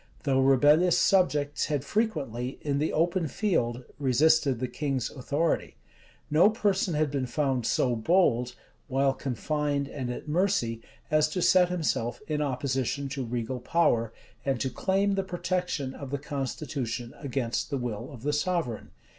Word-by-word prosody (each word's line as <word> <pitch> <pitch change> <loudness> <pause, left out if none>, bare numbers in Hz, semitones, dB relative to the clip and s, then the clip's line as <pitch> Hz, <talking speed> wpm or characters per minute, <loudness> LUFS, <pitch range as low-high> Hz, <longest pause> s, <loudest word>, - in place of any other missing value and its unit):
Though 135 -2 +2
rebellious 145 +6 +5
subjects 150 -7 +2
had 145 -2 -1
frequently, 140 - -2
in 140 -2 0
the 155 - 0
open 170 +1 +1
field, 130 - -1 0.2
resisted 140 +1 +3
the 130 - -1
king's 135 -2 -2
authority, 145 +4 -1 0.6
no 165 +7 +6
person 200 -5 0
had 150 -1 +1
been 135 -3 -1
found 135 -3 0
so 125 -2 +2
bold, 125 -3 +2 0.3
while 135 0 +2
confined 140 +2 -2
and 135 -3 -5
at 125 - -6
mercy, 150 - +1 0.3
as 155 0 +3
to 180 +4 -2
set 180 -2 +5
himself 155 -9 -1
in 150 -3 -1
opposition 135 0 -1
to 135 -1 -3
regal 120 +1 -3
power, 120 -5 +1 0.3
and 135 -3 0
to 130 - -1
claim 195 +5 +1
the 195 0 0
protection 180 -6 -2
of 140 -1 -8
the 140 - -2
constitution 135 -4 -4
against 130 -4 -2
the 140 - -1
will 120 +1 -4
of 125 -4 -11
the 150 +1 0
sovereign. 150 -6 -1
140 Hz, 150 wpm, -28 LUFS, 125-160 Hz, 0.6 s, no